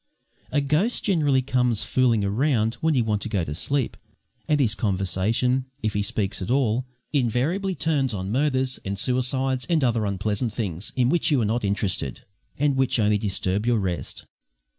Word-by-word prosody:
A 145 - +2
ghost 155 - +1
generally 145 -9 +2
comes 125 -4 +2
fooling 120 -5 +2
around 115 +1 +1
when 160 -1 +2
you 125 - +3
want 105 -2 -1
to - - -3
go 100 -5 0
to 75 - -4
sleep, 135 - -1 0.5
and 150 -1 +3
his 120 -6 +3
conversation, 110 +6 0 0.2
if 110 -1 0
he 105 - 0
speaks 100 -1 -2
at 90 - -4
all, 125 -1 +1 0.3
invariably 150 - 0
turns 145 -4 0
on 95 -2 -4
murders 130 0 0
and 100 +1 -3
suicides 130 +2 0
and 165 -4 +2
other 115 -4 +1
unpleasant 105 +3 -1
things 100 -5 -4
in 125 -2 +2
which 165 +2 +2
you 145 -4 +3
are 115 - +1
not 115 +3 0
interested, 100 -8 -1 0.4
and 145 -1 +1
which 130 -1 +2
only 105 -1 +3
disturb 100 +1 -1
your 120 -1 +3
rest. 95 -4 -3
120 Hz, 175 wpm, -24 LUFS, 105-135 Hz, 0.5 s, you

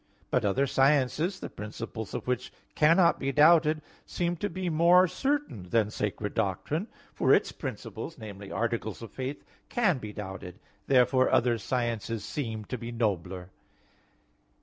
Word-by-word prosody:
But 125 - +2
other 130 +8 +2
sciences, 145 +7 +2
the - - -6
principles 110 +1 -6
of - - -4
which 125 0 -2 0.2
cannot 165 +3 +4
be 135 0 -1
doubted, 155 +1 +5 0.2
seem 175 0 -2
to 205 - -2
be 185 +1 -4
more 175 +3 +5
certain 270 - -2
than 110 -1 +2
sacred 105 -1 -3
doctrine; 115 - -1 0.3
for - - +2
its - - 0
principles 165 - -6
namely, 100 -4 -9
articles 115 -2 -2
of 115 - -9
faith 135 +2 -5 0.2
can 200 - +2
be 105 -3 -7
doubted. 95 -3 -7 0.3
Therefore 130 0 +4
other 120 -1 +3
sciences 115 -2 -2
seem 115 -7 -4
to 125 +3 -5
be 115 +1 -6
nobler. 95 -5 -2
125 Hz, 145 wpm, -28 LUFS, 105-155 Hz, 0.3 s, doubted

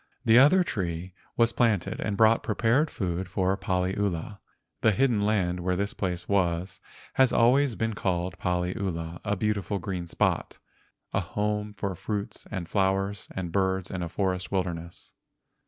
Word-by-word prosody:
The 115 +1 +7
other 160 +8 +6
tree 90 - -3 0.2
was 115 0 +3
planted 110 -4 +1
and 105 -2 -2
brought 110 +1 +5
pre¬ 105 - -3
pared 130 +8 +3
food 90 -4 -3
for 95 0 +1
Paliula. 95 0 -1 0.4
The 110 - +4
hidden 120 -2 +2
land 95 -4 +1
where 90 +1 0
this 100 +2 -1
place 90 -3 -3
was 90 -2 0 0.3
has 130 -1 +4
always 125 +2 +4
been 110 +1 -1
called 90 -2 -2
Paliula, 90 -2 -2
a 100 -1 0
beautiful 100 -1 -1
green 90 -2 -4
spot—a - - -3
home 105 0 -2
for 100 -1 -2
fruits 100 +3 -5
and 95 -5 -4
flowers 95 +1 0
and 90 -3 -3
birds 95 0 0
in 95 - -3
a 85 - -3
forest 95 0 -1
wilderness. 85 -3 -4
95 Hz, 150 wpm, -27 LUFS, 90-105 Hz, 0.4 s, The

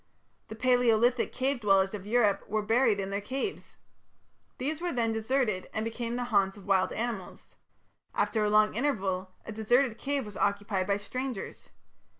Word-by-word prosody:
The 220 - -8
Palaeolithic 245 0 +3
cave 265 0 -1
dwellers 195 -2 +3
of 205 -1 -6
Europe 210 -3 +2
were 215 +1 0
buried 225 -1 +3
in 195 0 -3
their 200 +1 -2
caves. 270 - -5 0.8
These 300 +5 -3
were 350 0 -1
then 230 -2 0
deserted 220 -4 0
and 215 - -1
became 230 +1 -3
the 245 - -1
haunts 195 0 +3
of 200 - -13
wild 190 -2 +2
animals. 225 -5 -4 0.7
After 220 -2 +1
a 210 - +2
long 215 0 +4
interval 195 -8 -1 0.2
a - - -6
deserted 230 +2 +1
cave 280 -2 -1
was 210 -1 -8
occupied 200 -1 0
by 200 0 +2
strangers. 250 +2 -5
220 Hz, 160 wpm, -29 LUFS, 200-245 Hz, 0.8 s, long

